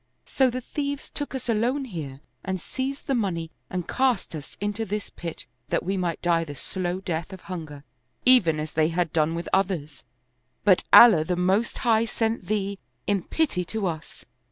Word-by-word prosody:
So 265 -2 +3
the 255 +1 -3
thieves 285 +2 -4
took 290 -2 -5
us 260 - -5
alone 240 +5 +1
here 150 - -6 0.2
and 190 -1 -2
seized 265 - -4
the 275 - 0
money 175 -9 -1 0.2
and 180 -2 -3
cast 255 -9 +1
us 150 -3 -8
into 205 +3 -2
this 210 -1 -4
pit 170 -2 -7 0.2
that - - 0
we 190 +3 -1
might 175 -3 -2
die 170 -1 +3
the 145 -3 -7
slow 185 +3 -3
death 170 -1 -3
of 190 -1 -9
hunger, 155 -6 -7 0.4
even 195 -12 +5
as 155 0 -4
they 155 0 +2
had 170 -1 -1
done 160 0 +2
with 170 0 -4
others; 175 -7 0 0.6
but 190 -3 +5
Allah 210 -10 +9
the 180 +3 -1
Most 190 +6 +1
High 225 -1 +4
sent 225 -4 -1
thee, 200 -2 -1 0.3
in 200 -2 +1
pity 280 - 0
to 215 +3 -3
us." 160 -3 -5
190 Hz, 180 wpm, -26 LUFS, 165-225 Hz, 0.6 s, Allah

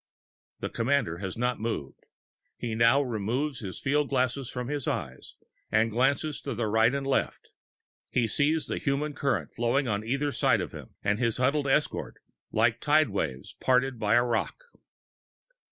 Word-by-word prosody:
The - - -2
commander 115 -9 0
has 95 0 -5
not 125 0 0
moved. 110 -11 -4 0.5
He 115 -2 -3
now 115 +5 +4
removes 125 +4 -2
his 95 -6 -6
field 145 +1 +1
glass 130 -2 +1
from 125 -1 -4
his 145 -1 -3
eyes 70 - -4 0.4
and 110 +1 +3
glances 140 +6 +1
to 135 -4 -4
the 115 +1 -1
right 110 +2 +4
and 140 -1 -2
left. 135 -1 -1 0.6
He 125 - +1
sees 150 +7 +1
the - - -3
human 145 +1 -1
current 140 -2 -1
flowing 120 +3 +1
on 105 -1 -1
either 140 +5 -1
side - - +2
of - - -4
him - - -11
and 105 +2 +1
his 115 -3 +1
huddled 140 +3 +1
escort, 150 +3 0 0.4
like - - +2
tide 155 -1 +4
waves 75 -10 -3
parted 130 -1 +2
by 105 +1 +3
a 120 - +5
rock. 125 - -2
125 Hz, 165 wpm, -28 LUFS, 110-140 Hz, 0.6 s, a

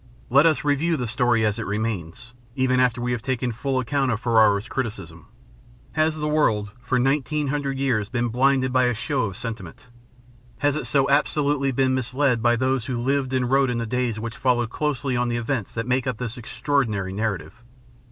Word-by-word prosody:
Let 140 +5 +6
us 155 - +1
review 150 +3 +1
the 125 - -2
story 120 -1 +1
as 105 +1 0
it 115 - -4
remains, 105 +1 -4 0.2
even 130 -1 +2
after 125 -2 +2
we 120 0 -2
have 120 -2 -2
taken 125 0 -1
full 130 +4 -2
account 135 +2 0
of 110 -3 0
Ferrero's 110 -3 +3
criticism. 105 - -5 0.6
Has 155 0 +1
the 150 0 -2
world 110 -10 +1
for 125 +1 0
nineteen 135 +2 0
hundred 140 -1 -2
years 120 -6 0
been 120 -1 -1
blinded 130 +1 +2
by 130 -1 +4
a 125 -1 +1
show 130 +2 -1
of 95 -3 -6
sentiment? 115 -2 -8 0.7
Has 145 -1 +1
it 155 - -3
so 135 -2 +2
absolutely 145 -1 +1
been 130 0 +1
misled 130 -1 0
by 120 +1 +3
those 130 0 0
who 125 - -3
lived 135 +1 0
and 130 -1 0
wrote 135 -1 +4
in 120 - -1
the 115 - -2
days 120 -1 -1
which 115 +1 -5
followed 120 -3 +1
closely 135 -3 -1
on 120 0 +1
the 120 - -1
events 120 -2 -2
that 115 -1 -2
make 125 +1 0
up 125 - -2
this 120 -1 -5
extraordinary 115 -6 -1
narrative? 110 +2 -3
125 Hz, 195 wpm, -23 LUFS, 115-135 Hz, 0.7 s, Let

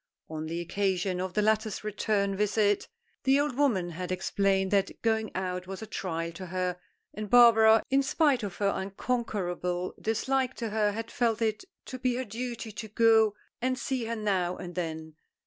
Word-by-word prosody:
On 155 0 -4
the 165 +2 -3
occasion 185 0 -1
of 185 -1 -4
the 210 - +2
latter's 220 0 +1
return 205 -1 0
visit 205 0 +1 0.4
the 270 +1 +4
old 290 -3 0
woman 220 -11 +1
had 180 +2 -5
explained 190 +1 +1
that 195 -1 +1
going 220 -1 +1
out 180 -1 -3
was 195 +3 -6
a - - -5
trial 170 -5 -3
to 185 +2 -8
her, 180 0 -2 0.3
and 210 0 -6
Barbara, 225 -2 +7
in 270 +1 +4
spite 275 -1 +2
of 200 -4 -5
her 200 -1 +1
unconquerable 190 -4 -2
dislike 260 +4 0
to 230 -3 -4
her, 210 -1 +2
had 225 +2 -5
felt 230 -3 +1
it 220 - -1 0.2
to 255 - -7
be 250 -1 +1
her 255 +1 -2
duty 230 0 -5
to 220 +2 -7
go 220 -1 +4 0.3
and 255 +1 0
see 260 -2 -2
her 230 +1 -2
now 190 -5 0
and 175 0 -7
then. 160 -3 -5
210 Hz, 180 wpm, -29 LUFS, 185-230 Hz, 0.4 s, Barbara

